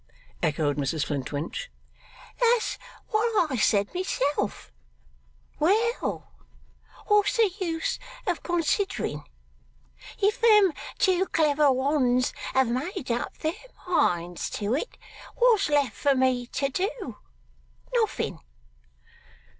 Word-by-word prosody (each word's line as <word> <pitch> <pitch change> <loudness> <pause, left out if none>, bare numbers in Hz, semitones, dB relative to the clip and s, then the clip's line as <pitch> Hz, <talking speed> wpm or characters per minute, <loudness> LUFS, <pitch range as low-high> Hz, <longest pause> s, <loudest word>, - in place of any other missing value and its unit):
echoed 150 -1 0
Mrs 145 +2 -1
Flintwinch. 145 - -4 0.7
'That's 475 -1 +2 0.3
what 430 -7 +1
I - - 0
said 205 -3 +2
myself. 285 - -2 0.9
Well! 440 +9 0 0.7
What's 415 +2 +3
the 440 -4 +4
use 330 -3 -2 0.3
of 360 -4 -1
considering? 345 - -1 1.0
If 420 +5 +1
them 420 -6 +6 0.2
two 375 0 +2
clever 300 -3 +3
ones 260 -1 +1 0.2
have 265 -1 +4
made 270 - -3
up 235 - -3
their 315 +1 -1 0.3
minds 175 - 0
to 210 +2 -1
it, 305 - -3 0.4
what's 460 -8 +4
left 285 -5 +2
for 280 -2 +2
me 255 -2 +1
to 275 +2 -1
do? 380 - -3 0.8
Nothing. - - 0
300 Hz, 100 wpm, -26 LUFS, 245-395 Hz, 1.0 s, them